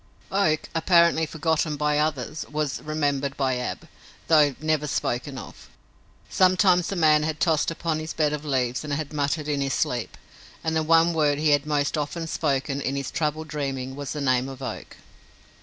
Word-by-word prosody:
Oak, 190 -6 +1
apparently 170 -1 +4
forgotten 160 -1 0
by 150 0 +1
others, 150 -1 -2
was 150 -2 -2
remembered 145 -2 -1
by 130 -2 +1
Ab, 125 - -5 0.4
though 150 -4 +5
never 155 -1 0
spoken 130 0 -2
of. - - -11 0.6
Sometimes 185 -1 +3
the 195 - -3
man 155 -3 +4
had 155 0 -2
tossed 160 -4 +2
upon 165 -1 -2
his 155 0 -5
bed 150 -2 +1
of 150 0 -4
leaves 130 -4 -1
and 150 -1 -4
had 150 +1 -3
muttered 145 +1 -1
in 145 -2 -1
his 135 -1 0
sleep, 120 -2 -2 0.5
and 160 0 -1
the 160 - +2
one 165 +2 +4
word 150 -3 +2
he 155 0 +2
had 145 0 +2
most 145 0 0
often 165 +3 -3
spoken 140 -3 -1
in 135 0 -2
this 140 -1 -3
troubled 155 0 -2
dreaming 135 -3 -3
was 140 -2 -5
the 150 - -4
name 130 -1 +1
of 135 -1 -9
Oak. 125 -4 -7
150 Hz, 180 wpm, -25 LUFS, 140-160 Hz, 0.6 s, though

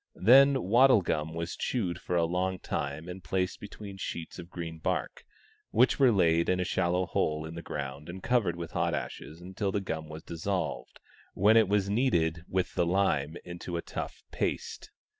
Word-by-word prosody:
Then 135 +4 +6
wattle 115 +1 +5
gum 80 0 -2
was 85 0 -3
chewed 90 -8 -2
for 90 - -2
a 85 -1 +3
long 90 +2 -1
time 75 -1 -4
and 90 0 -8
placed 90 +2 -1
between 100 -1 -9
sheets 85 -3 -6
of 85 - -9
green 85 -2 -6
bark, - - -2 0.5
which 120 +5 +3
were 130 -3 +6
laid 85 -5 +3
in 90 - +2
a - - +1
shallow 90 0 +1
hole 75 -2 -1
in 80 - -7
the 85 - -6
ground 70 -1 -6
and 95 +2 -8
covered 115 -8 +2
with 85 -1 -6
hot - - 0
ashes 75 +3 -6
until 95 +2 -3
the 100 - 0
gum 80 -5 -5
was 80 +1 -8
dissolved, 85 -3 -3 0.4
when 105 +4 +5
it 110 -3 +6
was 100 -1 +2
kneaded 85 -8 +1
with 95 -1 -1
the 85 - +1
lime 85 -5 +1
into 85 0 -5
a 85 - -4
tough - - -6
paste. - - -3
90 Hz, 185 wpm, -29 LUFS, 80-100 Hz, 0.5 s, Then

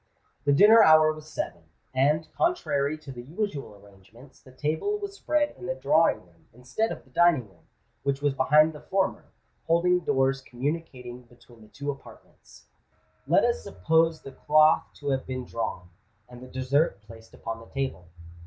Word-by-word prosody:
The 145 - +3
dinner 210 +10 +7
hour 155 -3 +6
was 155 0 -12
seven; 85 - -5 0.3
and, 150 +4 +2
contrary 155 - 0
to 155 -3 -11
the 120 -2 -8
usual 145 - -5
arrangements, 100 +6 -19
the 130 - -17
table 155 - -2
was 405 -1 -6
spread 305 -6 0
in 185 - -7
the 175 - -2
drawing 150 - +2
room, 85 -1 -27
instead 125 - -2
of - - -7
the 130 - -25
dining 165 -6 +3
room, 85 -5 -26 0.3
which 140 0 -1
was 145 -1 0
behind 150 +4 +4
the 150 - -10
former, 190 +4 -1 0.4
folding 180 +2 +3
doors 135 -4 0
communicating 130 -2 -5
between 120 -1 -20
the 110 - -16
two 140 +6 -5
apartments. 140 - -16 0.6
Let - - +4
us 80 - 0
suppose 160 - +1
the 135 - -9
cloth 155 +3 +3
to 145 -1 -4
have 135 -1 -2
been 130 -1 -4
drawn, 90 -7 -5 0.4
and 125 0 -13
the 130 - -10
dessert 130 - 0
placed 115 +1 -15
upon 115 0 -6
the 115 - -14
table. 135 -10 -4
140 Hz, 170 wpm, -26 LUFS, 125-160 Hz, 0.6 s, dinner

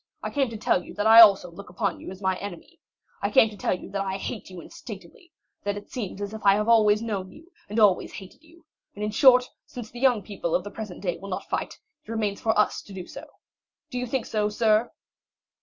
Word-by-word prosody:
I - - -3
came 275 -3 0
to 225 - -7
tell 180 -3 +1
you - - -12
that 205 - -2
I 225 +1 +10
also 195 -5 +6
look 200 +3 -11
upon 180 - -2
you - - -9
as 190 +1 -10
my 190 0 +1
enemy. 200 - -9 0.4
I - - 0
came 225 -5 +5
to - - -10
tell 190 - -1
you - - -11
that 200 0 -2
I 190 -1 -2
hate 200 0 -6
you 185 -1 -9
instinctively; 200 - -12 0.3
that 205 0 -2
it 205 - -11
seems 205 -6 -5
as 205 +1 -6
if 220 - -8
I 195 -1 +6
had 210 +1 -1
always 215 -2 +4
known 195 -5 -4
you, 330 +4 -17 0.2
and 210 +3 -1
always 205 -4 +3
hated 190 +6 -11
you; 330 +1 -21 0.3
and, 205 - -5
in 210 - -1
short, 250 +2 +6 0.2
since 240 -3 -9
the 240 - -9
young 245 -5 +3
people 190 -5 -3
of 180 - 0
the 205 - -8
present 210 -5 -8
day 175 -3 -2
will 195 - -9
not 185 - -4
fight, - - -3 0.3
it - - -20
remains 210 -3 -2
for 220 -1 +1
us 210 - +2
to 200 - -13
do 185 -2 -7
so. - - -10 0.6
Do 250 - -3
you 250 - -3
think 255 0 -2
so, 210 -1 -1
sir?" 220 +1 +2
210 Hz, 245 wpm, -25 LUFS, 195-230 Hz, 0.6 s, I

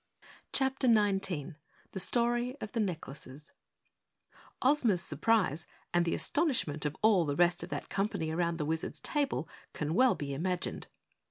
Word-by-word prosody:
CHAPTER 265 0 +1
19 195 - +1 0.3
The 190 - -5
Story 240 +5 +1
of 215 - -6
the 230 - -2
Necklaces 150 -6 -5 1.1
Ozma's 245 -9 +3
surprise 185 -9 +1 0.3
and 175 0 +3
the 170 - 0
astonishment 235 - +1
of 150 - -6
all 210 -5 +5
the 145 -3 -1
rest 175 +1 +3
of 170 - -6
that - - -4
company 195 -5 -1
around 170 0 0
the 150 - -2
Wizard's 160 +1 -3
table 285 - -1 0.3
can 150 +1 -2
well 255 +6 +4
be 140 -1 -4
imagined. 180 +5 -3
180 Hz, 145 wpm, -31 LUFS, 160-235 Hz, 1.1 s, all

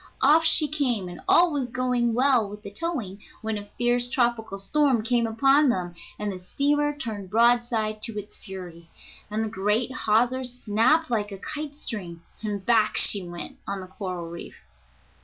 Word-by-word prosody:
Off 305 +4 +6
she 315 -1 +3
came, 255 -10 0
and 175 - -9
all 350 0 +5
was 270 -4 -2
going 250 -1 0
well 250 -4 +3
with 210 +1 -10
the 200 - -8
towing 225 - -4 0.2
when 220 0 -2
a 205 0 -7
fierce 245 0 +1
tropical 235 -5 0
storm 255 +3 +1
came 235 0 +1
upon 270 +6 +4
them, 180 -6 -1 0.2
and 210 -1 -3
the 185 - -7
steamer 290 +10 +1
turned 210 -8 -5
broadside 230 -1 +2
to 225 -2 -2
its 205 0 -7
fury, 175 -4 -10 0.4
and 215 +1 -1
the - - -1
great 210 +4 0
hawser 245 +2 +1
snapped 245 +5 +1
like 210 -3 -1
a 195 - -6
kite 300 +5 -5
string, 180 - -6 0.2
and 205 -3 -4
back 225 -3 +3
she 200 - +6
went 175 -1 -8
on 195 -1 -4
a - - -10
coral 185 -3 -5
reef. 170 +1 -9
225 Hz, 175 wpm, -25 LUFS, 200-255 Hz, 0.4 s, Off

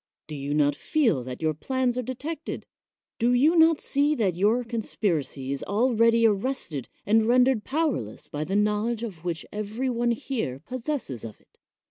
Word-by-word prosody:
Do 155 - -9
you 140 +1 -3
not 145 -1 +3
feel 230 - +1
that 130 +4 -7
your 155 -1 +2
plans 255 - -1
are 250 - 0
detected? 285 +6 -5 0.5
Do 240 +2 +3
you 295 +7 +4
not 325 -2 +5
see 290 +2 +1
that 205 -8 +1
your 210 +8 +2
conspiracy 175 - -2
is 140 - -3
already 230 +1 +3
arrested 205 - 0 0.2
and 220 +2 +3
rendered 250 -2 +4
powerless 275 - -2
by 150 +1 -4
the 195 - -2
knowledge 210 +3 +1
which 175 -6 -4
every 215 +5 -2
one 240 0 0
here 235 - -2
possesses 255 - -4
of 110 -2 -8
it? - - -34
225 Hz, 160 wpm, -26 LUFS, 165-255 Hz, 0.5 s, not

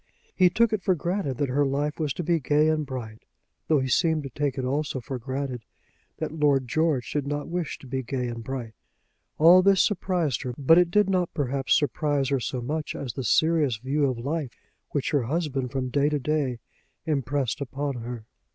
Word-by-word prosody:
He 185 -1 +5
took 225 +5 +2
it 215 - 0
for 185 0 +2
granted 170 -4 -2
that 145 -2 0
her 140 +3 +2
life 145 +3 -1
was 150 -3 0
to 175 - -4
be 170 +1 +2
gay 150 +2 +3
and 155 -2 0
bright, 115 -4 -6 0.5
though 155 -2 +4
he 130 - -1
seemed 160 +3 +2
to 135 - -7
take 145 +1 -2
it 130 - -2
also 140 +1 -1
for 130 +1 -5
granted 130 -1 -4 0.5
that - - -3
Lord 145 -4 +2
George 155 -2 0
did 145 -2 -2
not 145 +1 -3
wish 175 -3 -3
to - - -15
be 130 +1 -3
gay 125 0 -3
and 115 -1 -5
bright. 120 -3 -5 0.6
All 170 +4 +8
this 195 0 +5
surprised 175 - 0
her. 125 -3 -4
But 160 +5 +6
it 175 -1 +3
did 210 +2 +3
not 185 -3 +1
perhaps 135 -2 +1
surprise 145 -2 0
her 140 -1 +1
so 125 +1 -3
much 150 +5 -3
as 130 -5 -5
the 130 - -4
serious 150 - +2
view 135 +4 0
of 125 - -3
life 140 +2 -3 0.4
which 145 -2 -1
her 145 -3 +2
husband 135 -1 -2
from 130 -2 -2
day 145 +3 +2
to 150 - 0
day 140 -3 -1 0.5
impressed 140 -2 -1
upon 140 0 -3
her. 120 -1 -6
140 Hz, 205 wpm, -26 LUFS, 130-155 Hz, 0.6 s, All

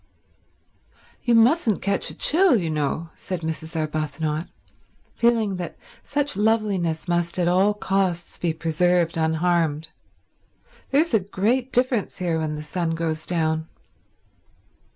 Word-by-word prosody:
"You 240 - +3
mustn't 230 - +3
catch 200 0 0
a - - -9
chill, 350 -1 +4
you 165 -3 -2
know," 155 +2 -2
said 185 -3 -5
Mrs. 160 0 -5
Arbuthnot, 155 0 -2 0.7
feeling 225 -5 +1
that 175 -1 -6 0.2
such 290 0 -1
loveliness 205 -7 0
must 175 0 0
at 175 -2 +1
all 190 +4 +3
costs 190 -4 -1
be 170 - 0
preserved 165 +2 +1
unharmed. 160 -1 0 1.0
"There's 300 +1 +2
a 220 - +5
great 220 +7 -1
difference 250 -4 +1
here 170 -3 -1
when 155 -1 -2
the 150 - -6
sun 165 +1 -2
goes 160 -1 -3
down." 160 -2 0
175 Hz, 125 wpm, -23 LUFS, 160-210 Hz, 1.0 s, a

